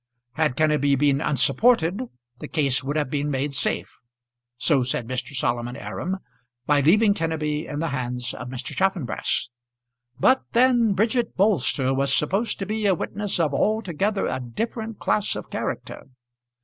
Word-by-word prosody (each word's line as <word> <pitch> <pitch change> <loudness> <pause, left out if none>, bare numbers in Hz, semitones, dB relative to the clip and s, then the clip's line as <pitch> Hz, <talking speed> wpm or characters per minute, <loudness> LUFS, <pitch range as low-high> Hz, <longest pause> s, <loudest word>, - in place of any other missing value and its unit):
Had 155 -2 0
Kenneby 150 -3 +3
been 140 0 +2
unsupported 170 - +3 0.4
the - - -6
case 140 -6 +1
would 140 +3 -3
have 150 -4 -1
been 145 0 -1
made 140 +1 -1
safe, - - -2 0.6
so 140 0 +3
said 125 -2 -2
Mr. 130 +2 -4
Solomon 120 -1 -1
Aram, 185 +6 -4 0.5
by 145 0 +3
leaving 200 +8 +5
Kenneby 160 -3 -2
in 145 - -4
the 165 +1 -1
hands 125 -2 -3
of 120 - -7
Mr. 130 0 -6
Chaffanbrass. 180 - 0 0.7
But 260 - +4
then 240 -3 +4
Bridget 225 +5 0
Bolster 145 - +2
was 135 0 +1
supposed 195 +9 0
to 195 - -4
be 215 +1 -1
a 190 - +4
witness 200 +3 -3
of 155 -4 +1
altogether 205 +2 0
a - - -2
different 220 - -4
class 210 - 0
of - - -7
character. - - -4
150 Hz, 150 wpm, -24 LUFS, 135-200 Hz, 0.7 s, leaving